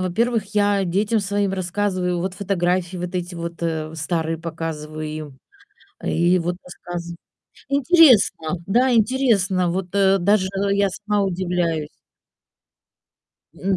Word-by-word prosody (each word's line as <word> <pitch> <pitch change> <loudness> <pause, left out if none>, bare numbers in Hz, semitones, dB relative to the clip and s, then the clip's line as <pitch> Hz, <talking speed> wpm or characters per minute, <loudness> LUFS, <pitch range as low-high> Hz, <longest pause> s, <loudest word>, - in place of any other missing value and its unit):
во-первых, 210 +3 -1
я 205 -1 +2
детям 205 +5 +1
своим 200 -1 -1
рассказываю, 185 -1 -1
вот 180 +2 -3
фотографии, 185 -2 -1
вот 180 +1 -4
эти 175 0 -4
вот, 170 0 -5
э, 160 -1 -2
старые 160 0 -2
показываю 155 -2 -5
им, 150 -3 -7 0.6
и 175 +2 +2
вот 175 +1 -2
рассказ 175 -1 -7 0.6
интересно, 255 - +4
да, 250 +5 +3
интересно, 215 -7 +2
вот, 185 +1 -2
э, 195 0 +4
даже 190 +1 +2 0.2
я 200 0 +2
сама 210 +1 -1
удивляюсь. 175 -4 -1 1.7
М, 190 0 -1
185 Hz, 120 wpm, -22 LUFS, 170-205 Hz, 1.7 s, интересно